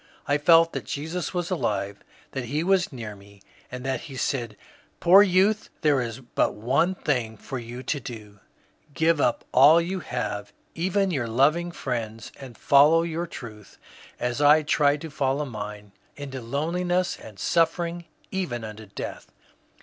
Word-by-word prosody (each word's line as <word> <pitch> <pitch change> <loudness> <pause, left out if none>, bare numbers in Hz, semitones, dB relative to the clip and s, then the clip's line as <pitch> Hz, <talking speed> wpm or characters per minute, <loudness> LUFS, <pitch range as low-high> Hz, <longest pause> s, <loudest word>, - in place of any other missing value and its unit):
I 145 +1 +2
felt 165 +2 +5
that - - -4
Jesus 160 +5 -4
was 180 0 -3
alive, 100 - -2 0.3
that 130 -2 -4
he 145 +7 -1
was 190 -1 +2
near 110 -5 -7
me; 100 0 -17 0.3
and 125 +1 -7
that 135 0 -1
he 135 - -8
said, 120 -6 -2 0.4
^^ - - -41
Poor 185 +4 +8
youth, 205 +2 +3
there 145 -4 +3
is 120 +1 -5
but 120 - -1
one 135 - +1
thing 120 -9 -1
for 130 +5 -6
you 120 +2 -8
to 145 +3 -2
do, 110 -5 -10 0.3
— 150 - -33
give 160 -1 +2
up 120 - +1
all 145 +6 +7
you 180 +3 -2
have, 105 - -4 0.2
even 190 +3 0
your 130 -8 -1
loving 150 +9 +2
friends, 115 -7 -5
and 130 -4 -10
follow 150 +4 +5
your 170 +1 -3
truth 105 -8 -11 0.4
as 120 +3 -2
I 150 +2 +6
tried 145 -1 +2
to 160 - -7
follow 140 0 0
mine, 105 -4 -7 0.2
into 135 -2 -7
loneliness 175 +8 -1
and 105 -3 -12
suffering, 170 - 0 0.3
even 175 -12 -3
unto 110 0 -8
death. 100 - -7
140 Hz, 165 wpm, -25 LUFS, 115-165 Hz, 0.4 s, Poor